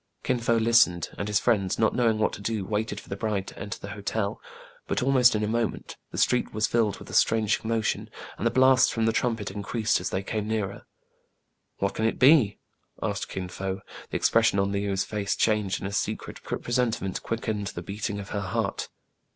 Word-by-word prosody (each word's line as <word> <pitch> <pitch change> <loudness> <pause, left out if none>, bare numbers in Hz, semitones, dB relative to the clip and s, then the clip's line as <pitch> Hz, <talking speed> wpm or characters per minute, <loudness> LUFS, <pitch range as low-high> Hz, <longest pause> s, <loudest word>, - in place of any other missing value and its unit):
Kin 125 - +1
Fo 115 0 +2
listened, 110 -7 +4
and 100 - -2
his 105 -1 +2
friends, 100 -6 +1
not 110 - +2
knowing 115 -3 +2
what 110 - +1
to - - -7
do, 105 -2 -2
waited 105 0 -2
for - - -15
the 100 - -4
bride 100 -2 -1
to - - -10
enter 105 - -5
the 100 - -8
hotel; 100 +1 -3 0.5
but, - - 0
almost 130 -3 +5
in 105 - 0
a - - 0
moment, 115 0 -2
the - - -8
street 125 - +2
was 110 0 +2
filled 110 -4 +1
with - - -12
a - - -10
strange 110 -2 +3
commotion, 115 -1 -1 0.3
and 115 - 0
the - - +4
blasts 130 +1 +5
from 115 -1 0
the 115 - +3
trumpet 115 -5 -1
increased 110 +2 0
as - - -2
they 95 - -2
came 105 +1 -3
nearer. 105 -3 -3 0.9
What 100 0 -1
can 110 - -1
it 115 - +1
be 130 -6 +5 0.2
} - - -46
" - - -13
asked - - -2
Kin 95 -1 -4
Fo. 95 +1 -4 0.3
The - - -1
expres - - +4
sion - - +1
of 100 0 +1
Le 100 - 0
ou's 100 -1 0
face 105 -2 -2
changed, 105 -3 +1
and 95 - -3
a 100 - -6
secret 105 - -3
pre - - -3
sentiment 120 -6 -1
quickened 110 -3 -2
the 85 - -6
beating 100 +2 -4
of 100 - -8
her 100 - -2
heart. 95 -1 -2
105 Hz, 220 wpm, -27 LUFS, 100-115 Hz, 0.9 s, almost